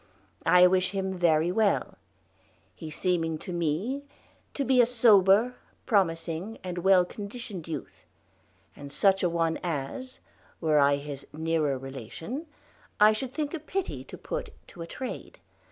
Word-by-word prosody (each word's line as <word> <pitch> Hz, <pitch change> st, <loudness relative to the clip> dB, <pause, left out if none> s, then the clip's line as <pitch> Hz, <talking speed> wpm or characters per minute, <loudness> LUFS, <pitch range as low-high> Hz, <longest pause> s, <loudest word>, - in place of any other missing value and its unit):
I 180 Hz, 0 st, +7 dB
wish 185 Hz, +1 st, +2 dB
him 190 Hz, -1 st, -2 dB
very 170 Hz, -1 st, +3 dB
well; 210 Hz, +1 st, +1 dB, 0.8 s
he 160 Hz, -, -8 dB
seeming 165 Hz, 0 st, -1 dB
to 180 Hz, -, -7 dB
me 175 Hz, -, -1 dB, 0.5 s
to 280 Hz, -, -1 dB
be 255 Hz, -1 st, +5 dB
a -, -, +5 dB
sober, 225 Hz, -1 st, +5 dB, 0.3 s
promising, 180 Hz, 0 st, 0 dB
and 180 Hz, -1 st, -4 dB
well 185 Hz, 0 st, +5 dB
conditioned 200 Hz, -3 st, -7 dB
youthe; 155 Hz, -4 st, -7 dB, 0.7 s
and 140 Hz, 0 st, -10 dB
such 195 Hz, +4 st, +3 dB
a 180 Hz, -, +2 dB
one 165 Hz, -1 st, 0 dB
as, 175 Hz, -, -4 dB, 0.4 s
were 155 Hz, -2 st, +3 dB
I 140 Hz, 0 st, +5 dB
his 140 Hz, -1 st, -7 dB
neerer 155 Hz, -3 st, 0 dB
relation, 135 Hz, -, -7 dB, 0.5 s
I 210 Hz, +1 st, +7 dB
shoulde 250 Hz, +4 st, -5 dB
thinke 300 Hz, 0 st, -3 dB
a 330 Hz, -, -3 dB
pitye 370 Hz, +5 st, -4 dB
to -, -, -9 dB
put -, -, -5 dB, 0.2 s
to 175 Hz, -, -11 dB
a 165 Hz, -, -6 dB
trade. 260 Hz, +8 st, -7 dB
180 Hz, 145 wpm, -28 LUFS, 160-225 Hz, 0.8 s, I